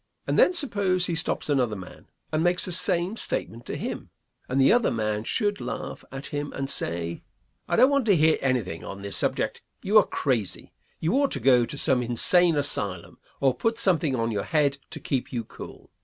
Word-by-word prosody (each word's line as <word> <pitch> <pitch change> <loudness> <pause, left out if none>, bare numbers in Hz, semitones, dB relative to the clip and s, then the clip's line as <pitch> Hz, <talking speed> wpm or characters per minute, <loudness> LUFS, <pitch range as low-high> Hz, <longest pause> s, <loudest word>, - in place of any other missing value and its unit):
And - - 0
then - - +6
suppose 200 - +1
he 175 - -2
stops 165 - -1
another 130 -7 +1
man, 95 -2 -11 0.2
and 155 +1 0
makes 175 +1 +1
the 185 - -4
same 185 +3 +1
statement 115 - -3
to - - -4
him, - - -6 0.4
and 130 +2 0
the 135 - +5
other 240 -1 +3
man 105 -1 -2
should 205 - -1
laugh - - -6
at 135 +1 -7
him 145 0 -3
and 135 0 -3
say, 85 0 -2 0.5
"I - - 0
don't 260 - +5
want 280 -4 +1
to 200 - +5
hear 160 0 +3
anything 120 -11 -1
on 100 0 -8
this 100 - -3
subject; - - 0 0.2
you 210 +3 +5
are 205 - +1
crazy; 115 -9 -2 0.3
you 165 +3 0
ought 280 - +2
to 140 - -2
go 125 -1 +4
to 145 - -6
some 130 -2 +2
insane 165 +8 +4
asylum, 100 - -1 0.2
or 135 -2 +3
put 225 - -1
something 170 - +1
on 115 -1 -1
your 100 -2 -3
head 145 -3 +1
to - - -8
keep 130 -3 -3
you 120 -3 -3
cool." - - -12
140 Hz, 200 wpm, -25 LUFS, 115-180 Hz, 0.5 s, then